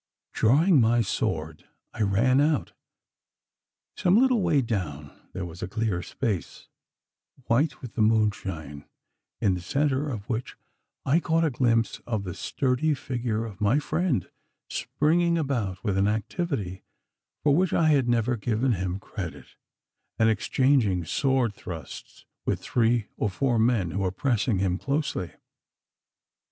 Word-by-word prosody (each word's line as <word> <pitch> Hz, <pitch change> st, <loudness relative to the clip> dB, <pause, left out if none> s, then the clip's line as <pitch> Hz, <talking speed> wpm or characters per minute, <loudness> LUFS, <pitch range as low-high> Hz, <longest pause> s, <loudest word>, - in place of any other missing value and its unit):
Drawing 145 Hz, -, +4 dB
my 115 Hz, +1 st, +3 dB
sword 80 Hz, -7 st, -2 dB, 0.3 s
I -, -, -5 dB
ran 115 Hz, +7 st, +3 dB
out. 150 Hz, -1 st, +1 dB, 1.2 s
Some 185 Hz, +5 st, +4 dB
little 255 Hz, -3 st, +3 dB
way 145 Hz, -7 st, +2 dB
down 75 Hz, -11 st, -3 dB, 0.2 s
there 95 Hz, -, -4 dB
was 85 Hz, 0 st, -9 dB
a -, -, -3 dB
clear 105 Hz, -3 st, -1 dB
space, 105 Hz, -3 st, -4 dB, 0.8 s
white 140 Hz, +5 st, +1 dB
with 125 Hz, -, -7 dB
the 115 Hz, -, -1 dB
moonshine, 95 Hz, -9 st, 0 dB, 0.6 s
in 95 Hz, -, +3 dB
the 90 Hz, -, -3 dB
centre 140 Hz, -, 0 dB
of 110 Hz, -5 st, -5 dB
which 120 Hz, 0 st, -4 dB, 0.5 s
I 145 Hz, +5 st, +4 dB
caught 165 Hz, 0 st, +1 dB
a 155 Hz, -, +1 dB
glimpse 115 Hz, -3 st, +1 dB
of 110 Hz, -4 st, -1 dB
the 90 Hz, -2 st, -5 dB
sturdy 135 Hz, -, 0 dB
figure 120 Hz, -4 st, -2 dB
of 105 Hz, -2 st, -10 dB
my 105 Hz, +6 st, +3 dB
friend 155 Hz, -, 0 dB, 0.4 s
springing 170 Hz, +3 st, +1 dB
about 115 Hz, -, -2 dB
with 100 Hz, -4 st, 0 dB
an 100 Hz, -, +3 dB
activity 110 Hz, -, -2 dB, 0.6 s
for 145 Hz, -1 st, +4 dB
which 185 Hz, +2 st, +2 dB
I 160 Hz, -2 st, +3 dB
had 135 Hz, -5 st, +3 dB
never 120 Hz, +1 st, +2 dB
given 120 Hz, +3 st, 0 dB
him 95 Hz, -3 st, -1 dB
credit, -, -, -7 dB, 0.6 s
and 115 Hz, 0 st, +4 dB
exchanging 110 Hz, -, +2 dB
sword 130 Hz, -, +1 dB
thrusts 80 Hz, -7 st, -9 dB, 0.2 s
with -, -, -1 dB
three 115 Hz, -2 st, +1 dB
or 105 Hz, -, 0 dB
four 120 Hz, +4 st, 0 dB
men 110 Hz, -7 st, +2 dB
who 100 Hz, -, -2 dB
were 95 Hz, -1 st, +1 dB
pressing 115 Hz, +1 st, 0 dB
him 90 Hz, 0 st, 0 dB
closely. 140 Hz, -, -2 dB
115 Hz, 140 wpm, -26 LUFS, 100-140 Hz, 1.2 s, Drawing